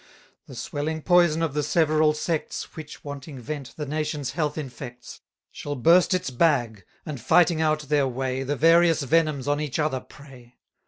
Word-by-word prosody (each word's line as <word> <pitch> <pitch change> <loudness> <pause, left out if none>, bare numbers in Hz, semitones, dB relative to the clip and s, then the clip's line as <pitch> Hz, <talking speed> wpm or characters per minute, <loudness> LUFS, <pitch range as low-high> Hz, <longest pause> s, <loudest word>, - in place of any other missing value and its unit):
The - - -11
swelling 155 +2 -4
poison 175 -2 +4
of 160 -4 -1
the 150 - 0
several 155 0 +2
sects, 160 0 -3
Which, 155 -2 -10
wanting 145 0 -8
vent, 140 +1 -7
the 150 - -4
nation's 150 -1 -3
health 150 -3 -2
infects, 125 -4 -8 0.3
Shall 145 0 -5
burst 170 +8 +4
its 180 -7 -3
bag; 120 - +1 0.2
and, 145 -6 -6
fighting 170 +4 +3
out 155 -1 +1
their 145 -1 +1
way, 130 +1 -3
The 135 +2 -2
various 165 +1 +4
venoms 150 -1 +1
on 145 +1 +1
each 145 -5 -3
other 150 -4 0
prey. 125 -4 -16
150 Hz, 165 wpm, -25 LUFS, 135-160 Hz, 0.3 s, poison